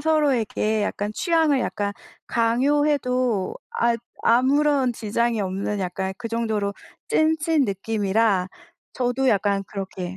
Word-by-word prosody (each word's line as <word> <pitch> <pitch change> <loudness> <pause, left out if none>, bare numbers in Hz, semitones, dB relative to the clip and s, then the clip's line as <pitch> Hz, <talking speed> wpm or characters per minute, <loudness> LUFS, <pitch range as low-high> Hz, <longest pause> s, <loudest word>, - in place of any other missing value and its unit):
서로에게 260 -8 +1
약간 205 0 -2
취향을 320 - +2
약간 205 -3 -2 0.3
강요해도 250 -2 +1 0.2
아 235 0 +3 0.3
아무런 265 +2 +3
지장이 230 +1 -1
없는 195 +2 -2
약간 190 +1 -3
그 230 -2 -5
정도로 220 -3 -1 0.3
찐친 315 -1 +2
느낌이라 200 -1 0 0.4
저도 255 +1 0
약간 200 -2 +2
그렇게 190 -2 -6
230 Hz, 255 characters per minute, -23 LUFS, 200-270 Hz, 0.4 s, 아